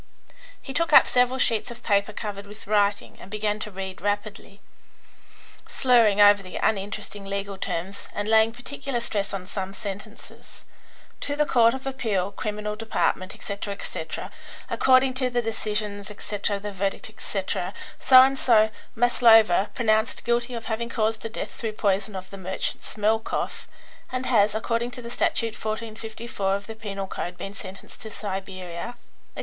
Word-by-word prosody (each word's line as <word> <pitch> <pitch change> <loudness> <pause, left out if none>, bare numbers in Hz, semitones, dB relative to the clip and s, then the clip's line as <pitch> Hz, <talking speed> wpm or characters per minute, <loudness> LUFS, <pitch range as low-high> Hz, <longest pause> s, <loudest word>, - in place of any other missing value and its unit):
He 270 - -8
took 335 +2 +1
up - - +10
several 250 +1 +2
sheets 225 -4 +1
of 240 0 -10
paper 200 0 +2
covered 205 -1 -6
with 210 +2 -12
writing, 205 0 +1
and - - -11
began 210 0 -1
to 210 - -4
read 190 -2 -6
rapidly, 205 0 -3 1.1
slurring 230 -5 +4
over 205 0 +7
the 185 -2 -10
uninteresting 205 0 -1
legal 200 0 -3
terms 190 +1 -4
and 205 0 -3
laying 220 0 +5
particular 245 +1 -4
stress 210 -4 -1
on 195 -2 -4
some 190 0 -4
sentences. 200 +2 -8 0.5
"To 285 - -2
the 300 0 +2
Court 235 -3 +4
of 265 - -8
Appeal, 215 -8 -1
criminal 210 0 -3
department, 210 -3 -1
etc., 200 0 -5
etc. - - -5 0.4
According 260 0 +4
to 255 - +2
the 245 0 0
decisions, 210 -3 -2
etc., 205 -1 -3
the 205 +1 -5
verdict, 195 0 -2
etc., - - -3 0.3
So 255 -1 +9
and 270 0 +1
so 220 -3 +5 0.2
Maslova 225 -5 +5
pronounced 220 -2 +1
guilty 240 +1 0
of 230 -1 -6
having 235 +1 -2
caused 220 -1 0
the 225 - -4
death 220 - -5
through 220 -2 -4
poison 200 -1 0
of 185 0 -7
the 195 - -8
merchant 190 +1 -3
Smelkoff, 220 +1 -1 0.4
and 255 0 -2
has, 210 -4 +3
according 230 +2 0
to 240 -1 -7
Statute 230 -1 0
1454 220 -2 -3
of 200 0 -5
the 225 - -7
penal 200 -3 -5
code, 180 -1 -5
been 195 - -6
sentenced 195 -1 -10
to 220 - -6
Siberia," 190 -1 -5
etc. - - -31
215 Hz, 155 wpm, -25 LUFS, 200-230 Hz, 1.1 s, up